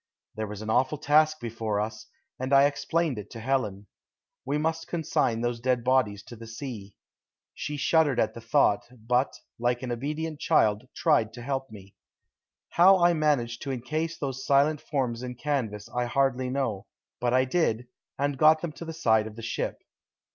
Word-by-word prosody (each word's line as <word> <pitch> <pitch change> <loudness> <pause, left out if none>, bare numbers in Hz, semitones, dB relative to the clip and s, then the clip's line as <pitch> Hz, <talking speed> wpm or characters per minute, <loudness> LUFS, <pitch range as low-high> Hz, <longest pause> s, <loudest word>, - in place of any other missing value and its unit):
There 110 0 -3
was 105 +1 -7
an 110 - -2
awful 130 +6 +2
task 155 +1 +3
before 110 -3 -2
us, 110 +1 -4 0.3
and 130 +1 -3
I 135 +1 +7
explained 150 -2 0
it 105 - -9
to 115 - -7
Helen. 110 -5 -1 0.6
We 140 +3 0
must 160 +1 -1
consign 140 -8 0
those 120 -1 -1
dead 125 0 0
bodies 115 -6 +1
to 120 - -11
the 115 0 -11
sea. 115 -4 -7 0.6
She 150 0 -4
shuddered 145 -3 +3
at - - +1
the 115 - -9
thought, 115 -3 +2
but, 125 +2 0 0.2
like 120 +1 0
an 125 - -3
obedient 150 +5 -3
child, 105 +3 +2
tried 130 -10 +2
to 120 0 -9
help 135 0 -3
me. 100 -3 -13 0.8
How 190 +3 +6
I 175 -1 +4
managed 140 -7 0
to 140 - -3
encase 155 +6 -3
those 135 -2 -4
silent 145 +2 +3
forms 125 -5 -2
in 125 -1 -5
canvas 120 -7 -2
I 125 0 -2
hardly 130 0 +1
know, 125 -7 -2 0.3
but 120 0 +1
I 130 0 +4
did, 125 -5 0 0.3
and 140 -1 -1
got 155 +1 +6
them 170 - -2
to 160 +3 -9
the 165 - -6
side 110 -9 +2
of 110 - -10
the 115 - -9
ship. 115 - -3
130 Hz, 180 wpm, -27 LUFS, 115-150 Hz, 0.8 s, I